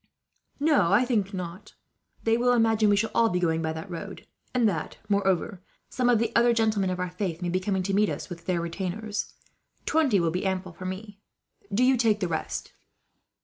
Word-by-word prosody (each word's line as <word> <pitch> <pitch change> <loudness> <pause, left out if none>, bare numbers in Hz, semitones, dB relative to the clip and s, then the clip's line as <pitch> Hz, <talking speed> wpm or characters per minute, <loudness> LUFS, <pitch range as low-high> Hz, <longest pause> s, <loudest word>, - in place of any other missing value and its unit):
"No, 285 - +3
I 220 +6 +5
think 210 -6 0
not. 185 0 -7 0.5
They 225 0 +3
will 245 +1 +3
imagine 225 -2 +3
we 205 - +5
shall 225 +2 0
all 230 -1 +4
be 180 - 0
going 165 -2 +1
by 160 -1 -1
that 160 +4 -7
road; 170 -3 -7 0.3
and 245 -3 +3
that, 165 -7 -3
moreover, 195 -1 0 0.3
some 250 -1 +1
of 240 - +5
the 230 +1 -1
other 235 0 +5
gentlemen 215 -4 +1
of 185 0 -3
our 180 -1 -2
faith 180 -3 -3
may 175 - -1
be 185 +2 +1
coming 190 0 -1
to 195 +1 -2
meet 205 +1 +3
us, - - -5
with 170 -2 -10
their 175 -2 +1
retainers. 195 +5 -4 0.5
Twenty 290 -11 +3
will 170 -2 +1
be 180 +2 -2
ample 190 -2 -2
for 185 +2 -9
me. 200 +2 -7 0.5
Do 215 +5 +2
you 260 0 +4
take 225 -3 +2
the 185 - 0
rest." 160 -2 -4
200 Hz, 205 wpm, -27 LUFS, 180-225 Hz, 0.5 s, I